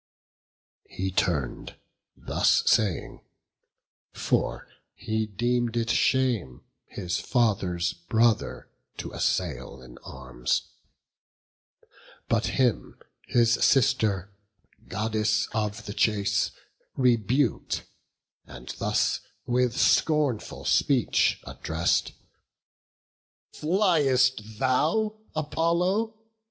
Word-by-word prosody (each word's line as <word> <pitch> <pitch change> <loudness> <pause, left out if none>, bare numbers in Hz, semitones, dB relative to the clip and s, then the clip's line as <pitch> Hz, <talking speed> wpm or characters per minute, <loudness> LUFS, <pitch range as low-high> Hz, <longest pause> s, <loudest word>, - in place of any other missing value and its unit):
He 95 +1 -3
turn'd, 75 -8 -1 0.4
thus - - +2
saying: 105 -6 +1 0.9
for - - -1 0.3
he 110 -1 -2
deem'd 120 +3 -1
it 115 0 0
shame 120 - +1 0.2
His 90 -1 -3
father's 95 -8 0
brother 110 +6 0 0.3
to - - -6
assail - - -2
in 65 -1 -14
arms; 65 -1 -3 1.6
But - - +1
him 125 -5 0 0.3
his 115 -1 +3
sister, 110 -8 +2 0.5
Goddess 110 +1 0
of 105 0 -2
the 105 - -5
chase, 105 -2 +1 0.5
Rebuk'd, 125 +1 +1 0.6
and 65 0 -11
thus - - +1 0.3
with 125 0 +1
scornful 150 -8 +1
speech 130 -6 +2
address'd: 80 +2 -1 1.4
"Fliest 135 - +2
thou, 160 - +1 0.2
Apollo? 175 +8 0
115 Hz, 75 wpm, -26 LUFS, 100-130 Hz, 1.6 s, his